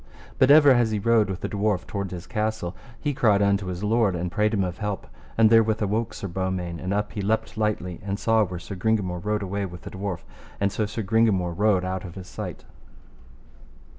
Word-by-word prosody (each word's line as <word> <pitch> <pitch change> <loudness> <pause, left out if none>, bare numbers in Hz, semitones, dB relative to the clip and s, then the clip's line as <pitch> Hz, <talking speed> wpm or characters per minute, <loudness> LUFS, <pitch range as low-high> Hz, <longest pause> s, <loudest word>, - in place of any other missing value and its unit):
But 130 - +5
ever 145 -1 +8
as 120 -3 +4
he 110 - -1
rode 110 -1 +3
with 95 -1 -4
the - - -2
dwarf 100 -3 0
toward 100 -2 -4
his 90 -1 -7
castle, 105 -4 -2 0.2
he 145 -1 -1
cried 110 -7 +3
unto 100 -1 +1
his 90 +1 -4
lord 105 -3 +2
and 85 0 -3
prayed 105 +4 +1
him 100 -3 +1
of 90 -2 -4
help. 105 -2 -3 0.3
And 110 -1 +5
therewith 110 -1 +4
awoke 105 +1 -1
Sir 100 - -5
Beaumains, 90 -2 -3
and 90 - -3
up 105 +1 -1
he 105 - -4
leapt 110 +3 -1
lightly, 105 -5 -1
and 100 0 -2
saw 110 0 +3
where 90 -3 -4
Sir 90 +3 -8
Gringamore 95 -3 -1
rode 105 0 -1
his 95 - -6
way 100 0 -1
with 90 -1 -10
the - - -8
dwarf, 95 -2 -4 0.4
and 100 0 +1
so 105 +1 -1
Sir 110 +1 -4
Gringamore 100 -4 +2
rode 100 0 +2
out 95 0 -3
of 85 -3 -9
his 95 -2 -8
sight. - - -7
100 Hz, 220 wpm, -25 LUFS, 95-110 Hz, 0.4 s, ever